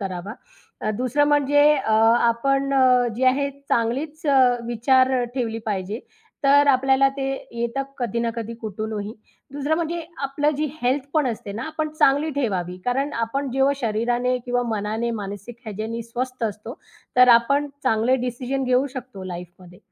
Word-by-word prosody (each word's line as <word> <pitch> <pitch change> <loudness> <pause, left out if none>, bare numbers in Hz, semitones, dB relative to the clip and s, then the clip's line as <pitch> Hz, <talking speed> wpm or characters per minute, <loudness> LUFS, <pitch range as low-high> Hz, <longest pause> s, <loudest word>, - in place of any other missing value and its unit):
करावा. 190 0 -5 0.6
दुसरं 255 +4 +1
म्हणजे 290 0 +3
अ, 260 -6 -1 0.3
आपण 275 +4 +1
अ, 255 -2 +4
जे 260 - 0
आहे 280 +2 +2 0.2
चांगलीच 280 +7 -1
अ, 280 -2 +4 0.3
विचार 255 +3 +3
अ, - - 0
ठेवली 230 -4 -2
पाहिजे, 205 +2 -3 0.4
तर 285 +1 +6
आपल्याला 270 0 +4
ते 270 -1 -2 0.3
येतं 235 +3 -1 0.2
कधी 235 -2 -2
ना 230 0 0
कधी 230 0 -5
कुठूनही. 215 0 -4 0.4
दुसरं 290 +2 0
म्हणजे 340 +1 -2 0.2
आपलं 290 +2 +1
जी 305 - 0 0.2
हेल्थ 260 +2 +1
पण 305 -3 +3
असते 220 -4 -4
ना, 225 +4 -5
आपण 310 0 -3
चांगली 285 +3 +3
ठेवावी 195 - -2
कारण 270 +4 0
आपण 255 +4 -2
जेव्हा 270 +2 +2
शरीराने 240 +2 0
किंवा 245 0 +1
मनाने 215 +3 -2
मानसिक 205 +3 -7
ह्याच्यानी 220 +2 -4
स्वस्थ 250 +2 -4
असतो, 220 - -5 0.4
तर 250 0 +7
आपण 275 +5 +4
चांगले 245 +1 +2
डिसिजन 255 +2 -3
घेऊ 255 +2 +2
शकतो 245 -7 -8
लाईफमध्ये 180 0 -9
250 Hz, 150 wpm, -23 LUFS, 225-275 Hz, 0.6 s, तर